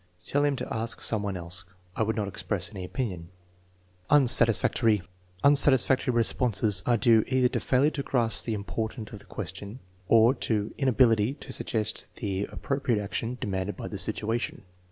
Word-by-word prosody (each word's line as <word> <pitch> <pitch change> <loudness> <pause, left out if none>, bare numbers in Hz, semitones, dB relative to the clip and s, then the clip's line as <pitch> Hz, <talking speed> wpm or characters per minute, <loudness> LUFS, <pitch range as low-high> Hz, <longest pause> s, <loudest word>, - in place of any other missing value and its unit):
"Tell 145 +7 0
him 145 -1 +1
to - - -6
ask 115 +1 -2
someone 100 -3 +1
else." 90 +1 0 0.3
"I - - -3
would 110 +1 0
not 105 -2 -2
express 100 -1 -4
any 95 -4 -8
opinion." 90 -5 -5 0.8
Unsatisfactory. 115 -6 +4 0.4
Unsatisfactory 135 -3 +5
responses 115 -4 +2
are 120 -1 +3
due 115 -2 +4
either 130 -1 +2
to - - -2
fail 130 +1 +1
ure 150 - +3
to 140 - -4
grasp 115 -6 -2
the 115 - -2
import 110 +3 -5
of 110 -2 -9
the - - -17
question, 100 +5 -8 0.3
or 115 +4 +5
to 105 -5 -3
inability 125 -3 +2
to - - -8
suggest 110 -1 -3
the 100 -1 -3
appropriate 135 -5 -2
action 115 +4 -4
demanded 95 0 -3
by - - -6
the - - -5
situation. 115 -1 -2
115 Hz, 160 wpm, -26 LUFS, 105-125 Hz, 0.8 s, Unsatisfactory